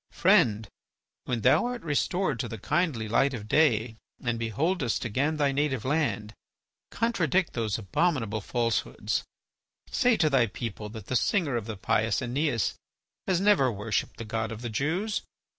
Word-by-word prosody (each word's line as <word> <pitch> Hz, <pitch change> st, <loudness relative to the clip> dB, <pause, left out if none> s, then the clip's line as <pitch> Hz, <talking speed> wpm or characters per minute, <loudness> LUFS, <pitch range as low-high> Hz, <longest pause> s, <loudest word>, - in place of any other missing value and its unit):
Friend, 105 Hz, -1 st, +3 dB, 0.6 s
when 120 Hz, -3 st, -2 dB
thou 130 Hz, -, +4 dB
art 245 Hz, -1 st, -5 dB
restored 155 Hz, -1 st, 0 dB
to -, -, -2 dB
the 115 Hz, -, -6 dB
kindly 130 Hz, -, 0 dB
light 135 Hz, +5 st, +2 dB
of 105 Hz, -2 st, -7 dB
day 115 Hz, -5 st, +2 dB, 0.2 s
and 120 Hz, -2 st, -2 dB
beholdest 120 Hz, -, -1 dB
again 140 Hz, +8 st, 0 dB
thy 145 Hz, -2 st, +2 dB
native 135 Hz, -4 st, -1 dB
land, 120 Hz, -8 st, 0 dB, 0.6 s
contradict 190 Hz, -, +1 dB
those 110 Hz, -4 st, -1 dB
abominable 115 Hz, -, 0 dB
falsehoods. 115 Hz, +1 st, -1 dB, 0.7 s
Say 245 Hz, -2 st, +3 dB
to 160 Hz, -, +3 dB
thy 135 Hz, -5 st, +3 dB
people 110 Hz, -3 st, -6 dB
that 110 Hz, -2 st, -9 dB
the 130 Hz, -, -3 dB
singer 160 Hz, -, +1 dB
of 115 Hz, -2 st, -3 dB
the 110 Hz, -2 st, -5 dB
pious 110 Hz, +2 st, +1 dB
Æneas 125 Hz, -1 st, 0 dB, 0.5 s
has 185 Hz, -2 st, +2 dB
never 190 Hz, -10 st, +4 dB
worshipped 105 Hz, +1 st, -2 dB
the 115 Hz, -, -6 dB
god 110 Hz, 0 st, -2 dB
of 115 Hz, +2 st, -7 dB
the 120 Hz, -, -4 dB
Jews. 170 Hz, -, -1 dB
125 Hz, 155 wpm, -28 LUFS, 110-155 Hz, 0.7 s, thou